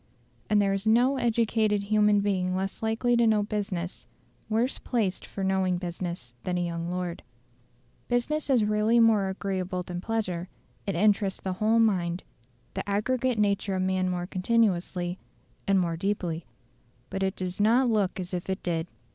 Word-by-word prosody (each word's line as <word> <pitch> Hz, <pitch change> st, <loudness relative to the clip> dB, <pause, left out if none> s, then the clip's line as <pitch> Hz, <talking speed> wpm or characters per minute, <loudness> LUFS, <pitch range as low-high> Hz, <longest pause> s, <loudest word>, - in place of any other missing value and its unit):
And 210 Hz, -1 st, +4 dB
there 200 Hz, -1 st, +2 dB
is 195 Hz, +2 st, -2 dB
no 245 Hz, +5 st, +4 dB
educated 225 Hz, -3 st, +1 dB
human 210 Hz, 0 st, +3 dB
being 185 Hz, -2 st, 0 dB
less 190 Hz, +1 st, -3 dB
likely 225 Hz, +2 st, +1 dB
to 235 Hz, -1 st, +4 dB
know 215 Hz, -1 st, +3 dB
business, 200 Hz, -4 st, -4 dB, 0.4 s
worse 230 Hz, +4 st, 0 dB
placed 215 Hz, -7 st, -1 dB
for 195 Hz, -, -5 dB
knowing 190 Hz, -1 st, +1 dB
business 175 Hz, -7 st, -5 dB
than 180 Hz, -1 st, -1 dB
a 175 Hz, -, 0 dB
young 170 Hz, 0 st, -3 dB
lord. 180 Hz, -1 st, -3 dB, 0.9 s
Business 280 Hz, +6 st, 0 dB
is 245 Hz, -6 st, +4 dB
really 215 Hz, +2 st, +3 dB
more 220 Hz, -4 st, +4 dB
agreeable 190 Hz, -1 st, -3 dB
than 175 Hz, 0 st, -5 dB
pleasure; 185 Hz, -5 st, -2 dB, 0.4 s
it 195 Hz, -, -1 dB
interests 200 Hz, +1 st, +2 dB
the 190 Hz, -, -2 dB
whole 215 Hz, +4 st, +2 dB
mind, 185 Hz, -6 st, +2 dB, 0.5 s
the -, -, -4 dB
aggregate 245 Hz, +4 st, +1 dB
nature 200 Hz, -1 st, +1 dB
of 185 Hz, -, 0 dB
man 185 Hz, 0 st, +1 dB
more 175 Hz, -1 st, -2 dB
continuously, 185 Hz, -3 st, 0 dB, 0.5 s
and 195 Hz, -1 st, +4 dB
more 170 Hz, -2 st, 0 dB
deeply. 175 Hz, -4 st, -2 dB, 0.6 s
But 195 Hz, -, -3 dB
it 190 Hz, +1 st, 0 dB
does 185 Hz, +1 st, -4 dB
not 240 Hz, +5 st, +4 dB
look 205 Hz, -5 st, +1 dB
as 180 Hz, 0 st, -5 dB
if 180 Hz, +1 st, -3 dB
it 190 Hz, -, -2 dB
did. 165 Hz, -1 st, -1 dB
195 Hz, 165 wpm, -27 LUFS, 180-220 Hz, 0.9 s, And